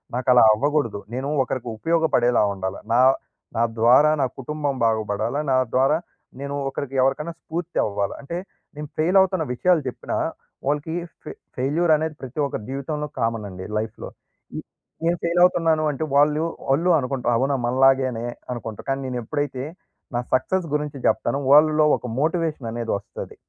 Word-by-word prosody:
నాకలా 125 -1 +5
అవ్వకూడదు. 135 -3 0
నేను 130 +3 -3
ఒకరికి 125 -2 -4
ఉపయోగపడేలా 145 -5 +2
ఉండాల. 95 0 -4 0.2
నా 120 - +4 0.6
నా 115 - +3 0.2
ద్వారా 130 +7 +6
నా - - +3
కుటుంబం 145 +1 -2
బాగుపడాలా, 110 +3 0
నా - - +4 0.2
ద్వారా 135 +4 +3 0.4
నేను 140 +1 -4
ఒకరికి 135 -1 -5
ఎవరికైనా 150 +5 0
స్ఫూర్తి 170 +1 -5
అవ్వాల. 100 -1 -2
అంటే, 170 +5 -5 0.4
నేను 150 0 -6
ఫెయిల్ 175 +5 +3
అవుతున్న 185 -3 +1
విషయాలు 170 +5 +2
చెప్పినా - - -5 0.5
వాళ్ళకి 150 +2 -1 0.3
ఫె - - -7 0.3
ఫెయిల్యూర్ 155 +6 +1
అనేది 160 0 -3
ప్రతి 130 +3 -7
ఒక్కరి 110 -6 -5
జీవితంలో 150 +2 -3
కామన్ 115 -2 -1
అండి 95 0 -8
లైఫ్‌లో. 110 0 -4 0.5
ఈ - - -3 0.5
నేను 170 +1 +2
ఫెయిల్ 170 +1 +1
అవుతున్నాను 165 -3 +3
అంటే 145 +2 -4
వాళ్ళు 150 +2 +4 0.3
వాళ్ళు 165 +7 +2
అనుకుంటారు 125 -2 -1
అవునా 135 +2 +1
మనలాగేనే 130 -1 +3 0.3
అనుకుంటారు. 115 -3 -7
కానీ, 135 0 0
నేనెప్పుడైతే 130 +2 -3 0.5
నా 120 - +1
సక్సెస్ 170 +7 0
గురించి 150 -1 -3
చెప్తానో, 135 +5 0
వాళ్ళలో 155 +1 +6
ఒక 125 - -8
మోటివేషన్ 155 -6 -1
అనేది 115 -1 -3
వస్తది. - - -9
135 Hz, 145 wpm, -23 LUFS, 120-155 Hz, 0.6 s, ద్వారా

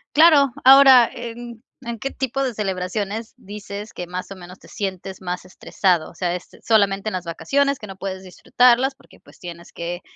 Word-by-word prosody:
Claro, 290 -5 +6
ahora, 265 -2 +8
¿en 235 0 -9 0.2
en 235 -2 -5
qué 275 - -4
tipo 270 +1 -3
de 255 -3 -2
celebraciones 200 +2 -4
dices 205 -1 -9
que 180 - -7
más 180 +2 -6
o - - -7
menos 180 +1 -12
te - - -18
sientes 190 -1 -6
más 180 0 -4
estresado?, 185 -2 -1
o - - -21
sea, 175 -2 -2
est 180 - -10
solamente 200 -2 +2
en - - -9
las 180 -1 -4
vacaciones 280 +11 0
que 210 - -9
no 195 - -9
puedes 190 -1 -6
disfrutarlas 250 +7 +2
porque, - - -22
pues, - - -20
tienes 170 -1 -10
que, 175 +1 -5
205 Hz, 190 wpm, -21 LUFS, 185-245 Hz, 0.2 s, ahora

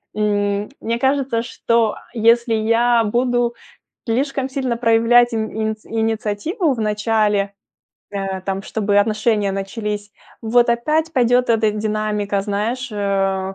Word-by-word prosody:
м, 205 -1 0
мне 230 +1 -2
кажется, 265 -3 +1
что 230 -2 0 0.2
если 230 0 +3
я 230 +2 +3
буду 240 +1 0 0.5
слишком 265 +3 -1
сильно 260 -3 -2
проявлять 235 +1 +4
ин 220 -1 -1
иниц 220 0 -3
инициативу 225 - -1
в 230 - -7
начале, 210 -1 +1 0.6
э, 195 -1 -3
там, 195 0 -3
чтобы 205 -1 -1
отношения 215 -1 +1
начались, 205 +1 -4 0.3
вот 240 +2 +3
опять 310 +7 0
пойдет 245 -2 +2
эта 220 -1 +3
динамика, 210 -1 -1
знаешь, 220 +6 -2
э 195 -1 -1
220 Hz, 120 wpm, -19 LUFS, 205-240 Hz, 0.6 s, проявлять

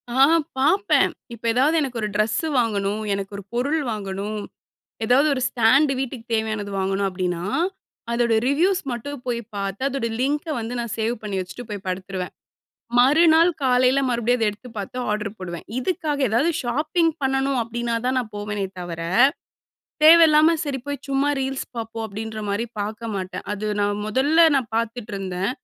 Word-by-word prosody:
ஆ, - - -5 0.5
பாப்பேன். 385 +9 +3 0.2
இப்ப 235 - -12
ஏதாது 275 +7 +3
எனக்கு 255 -5 -3
ஒரு 215 - 0
ட்ரெஸ்ஸு 215 +9 +1
வாங்கணும், 210 -2 0
எனக்கு 195 0 -4
ஒரு 200 - -8
பொருள் 280 +6 0
வாங்கணும், 205 0 -4 0.7
ஏதாது 255 +6 +4
ஒரு 260 - -3
ஸ்டாண்டு 270 +5 +4
வீட்டுக்கு 250 -3 -5
தேவையானது 215 -2 -1
வாங்கணும் 195 +1 0
அப்டின்னா 180 -2 -2 0.7
அதோட 235 -1 +2
ரிவ்யூஸ் 350 +8 +2
மட்டும் 250 +3 -5
போய் 240 -1 -1 0.2
பாத்து, 195 0 -3
அதோட 275 -3 -2
லிங்க 290 +4 0
வந்து 230 +2 -4
நான் 235 -2 -3
சேவ் 225 +2 0
பண்ணி 205 -2 -3
வச்சுட்டு 185 +7 -7
போய் 205 -2 -6
படுத்துருவேன். 185 0 -4 0.7
மறுநாள் 320 +6 +6
காலைல 255 0 +3
மறுபடியும் 240 0 +1
அத 225 - +2
எடுத்து 215 +5 -10
பாத்து 205 +5 -5
ஆர்டர் 210 0 -3
போடுவேன். 175 -3 -7
இதுக்காக 300 -1 -2
ஏதாது 235 +10 +2
ஷாப்பிங் 305 +7 +1
பண்ணணு 270 0 +1
அப்டினா 235 +1 -2
தான் 255 +1 +1
நான் 240 -4 -2
போவேனே 205 -1 -3
தவர, 170 -2 -6 1.0
தேவயில்லாம 320 0 +7
சரி 280 -3 -2
போய் 285 0 -3
சும்மா 275 +1 +1
ரீல்ஸ் 265 0 -3
பாப்போம் 225 0 -4
அப்படின்ற 220 +1 -6
மாரி 200 +3 0 0.2
பாக்க 220 +3 -4
மாட்டேன். 185 -1 -5
அது 210 +1 -4
நான் 205 0 0
முதல்ல 285 +9 +4
நான் 255 -4 -1
பாத்துட்ருந்தேன். 210 -5 -2
235 Hz, 150 wpm, -23 LUFS, 205-270 Hz, 1.0 s, தேவயில்லாம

